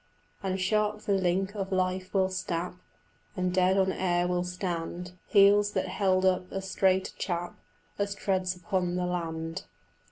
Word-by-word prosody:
And 190 -1 -2
sharp 210 +2 +1
the 200 - +1
link 190 +1 +1
of 195 -1 -3
life 185 0 0
will 190 -1 +2
snap, 180 -2 -3 0.6
And 180 0 0
dead 185 +1 +3
on 190 -1 +3
air 175 -2 +1
will 180 0 0
stand 180 -1 -4 0.2
Heels 205 0 +5
that - - -1
held 190 -1 +2
up 185 -1 +1
as 195 0 -4
straight 190 -1 +2
a - - -16
chap 175 -1 -2 0.5
As 200 0 -1
treads 185 -2 0
upon 180 -2 -1
the 180 0 0
land. 165 0 -3
185 Hz, 160 wpm, -29 LUFS, 180-195 Hz, 0.6 s, Heels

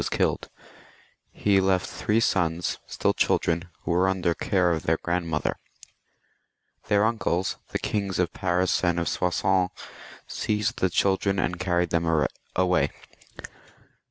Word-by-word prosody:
was - - -2
killed. - - 0 0.8
He 100 -2 +2
left 95 -1 +2
three 105 +2 0
sons, 90 -6 0
still - - 0
children, 85 +1 +1 0.2
who - - -2
were 90 +2 +3
under 95 -2 +1
the - - +2 0.2
care 90 -3 +3
of 80 -2 0
their 80 0 +1
grandmother. 85 -3 -1 1.3
Their 105 +1 +3
uncles, 100 -5 0
the - - -1
Kings 100 -3 -2
of 90 -1 0
Paris 90 0 +1
and 85 -1 +2
of 85 - -1
Soissons, 90 +1 +1 0.6
seized 105 -1 -2
the 95 - +2
children 95 +2 +1
and 90 -1 -1
carried 90 -1 0
them 80 -2 +2 0.3
away. 90 0 +2
90 Hz, 135 wpm, -26 LUFS, 85-95 Hz, 1.3 s, were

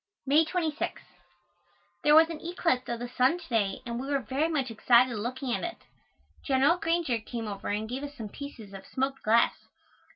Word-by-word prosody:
May 295 +4 +4
26. 320 -3 -2 1.0
There 295 0 +6
was 320 +1 +8
an 310 - -7
eclipse 330 -7 0
of 235 - -1
the 245 +1 -5
sun 255 +6 +2
to 355 - -12
day 205 -5 0
and 235 0 -4
we 265 - -5
were 285 0 +1
very 270 +5 -1
much 275 -6 -1
excited 240 +2 +4
looking 245 +4 -3
at - - -2
it. 345 0 -4 0.7
General 275 +5 +3
Granger 330 -8 0
came 225 0 -6
over 200 -2 -6
and 210 +2 -1
gave 255 +4 -4
us 290 0 -7
some 220 -5 -7
pieces 230 -6 -9
of 195 0 -10
smoked 270 +1 -2
glass. 225 +2 +4
260 Hz, 190 wpm, -28 LUFS, 235-300 Hz, 1.0 s, was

